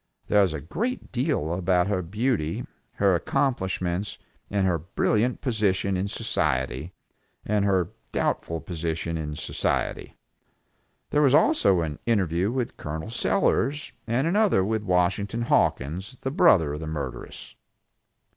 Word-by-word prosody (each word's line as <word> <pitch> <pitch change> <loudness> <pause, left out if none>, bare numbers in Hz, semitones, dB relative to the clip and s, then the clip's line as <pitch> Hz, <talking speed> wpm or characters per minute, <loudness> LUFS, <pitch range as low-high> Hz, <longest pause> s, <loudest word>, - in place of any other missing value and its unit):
There 105 - +5
was 95 -5 +2
a - - -3
great 225 - -3
deal 125 - 0
about 90 0 +2
her 100 -2 0
beauty, 100 - -1 0.3
her 100 -2 +3
accomplishments 95 -2 -1 0.3
and 100 -1 +1
her 85 -3 +1
brilliant 105 +8 0
position 100 -6 +1
in 95 +2 -1
society, 75 - -1 0.5
and 105 -1 +1
her 95 -3 +2 0.2
doubtful 85 -1 -1
position 85 -1 -3
in 75 -2 -4
society. 80 - -2 0.9
There 150 - +3
was 140 -2 +5
also 150 - +4
an 75 -3 -4
interview 95 -4 +2
with 125 -2 -3
Col. 80 +8 -5
Sellers 145 0 +1
and 120 +5 +1
another 200 - +3
with 110 +1 0
Washington 100 +4 0
Hawkins, 95 - 0
the 135 - -2
brother 95 - +4
of 75 - -4
the 80 - -6
murderess. 75 -2 -6
95 Hz, 130 wpm, -26 LUFS, 85-115 Hz, 0.9 s, There